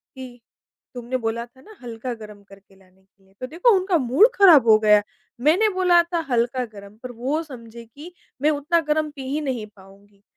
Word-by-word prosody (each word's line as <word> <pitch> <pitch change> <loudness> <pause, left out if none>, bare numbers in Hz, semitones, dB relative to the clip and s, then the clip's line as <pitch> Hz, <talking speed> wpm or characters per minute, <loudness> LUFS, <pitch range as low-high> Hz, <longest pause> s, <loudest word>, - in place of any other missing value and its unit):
कि, 250 -2 -11 0.5
"तुमने 245 +1 -4
बोला 230 0 -4
था 250 +2 -23
ना 430 +6 -16
हल्का 240 +1 -6
गरम 210 -2 -13
करके 195 0 -20
लाने 190 0 -27
के 195 0 -36
लिए।" 190 0 -28
तो 255 - -4
देखो 350 - +2
उनका 370 -1 0
मूड 275 - +4
ख़राब 330 - +6
हो 215 -1 +7
गया, 210 -1 +4 0.4
मैंने 360 - +3
बोला 360 -2 +4
था 340 0 -3
हल्का 245 +1 0
गरम 205 -2 -14
पर 250 - -7
वो 260 +7 -3
समझे 235 -5 -12
कि 295 +10 -14 0.3
मैं 300 - +3
उतना 300 +3 0
गरम 305 0 0
पी 285 -2 -11
ही 305 +2 -2
नहीं 255 -6 -4
पाऊँगी। 200 +1 -21
245 Hz, 195 wpm, -22 LUFS, 215-305 Hz, 0.5 s, हो